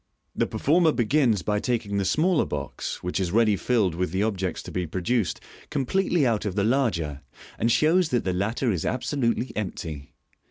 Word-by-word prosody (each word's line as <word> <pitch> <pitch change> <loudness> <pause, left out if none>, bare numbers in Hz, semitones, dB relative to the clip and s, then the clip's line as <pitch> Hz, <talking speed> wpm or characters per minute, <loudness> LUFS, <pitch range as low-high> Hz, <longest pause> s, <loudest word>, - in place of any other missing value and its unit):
The - - +1
performer 160 +2 +3
begins 120 - +2
by 105 -1 0
taking 110 -4 -1
the 100 - 0
smaller 155 - +2
box 70 -2 -5
(which 90 +2 -2
is 90 -3 -1
ready 110 0 +4
rilled 100 -3 +1
with 90 +1 -1
the 95 +4 0
objects 95 -5 -2
to - - -8
be 90 -2 -2
produced) 95 +4 -1 0.3
completely 160 +3 +1
out 115 -4 +1
of 100 -3 -3
the 100 - +1
larger, 100 - 0 0.4
and 115 +2 +2
shows 165 +6 +3
that 120 -5 +1
the 95 - -1
latter 110 +6 0
is 90 -6 -2
absolutely 130 -1 -1
empty. 80 -8 -5
110 Hz, 175 wpm, -25 LUFS, 90-130 Hz, 0.4 s, ready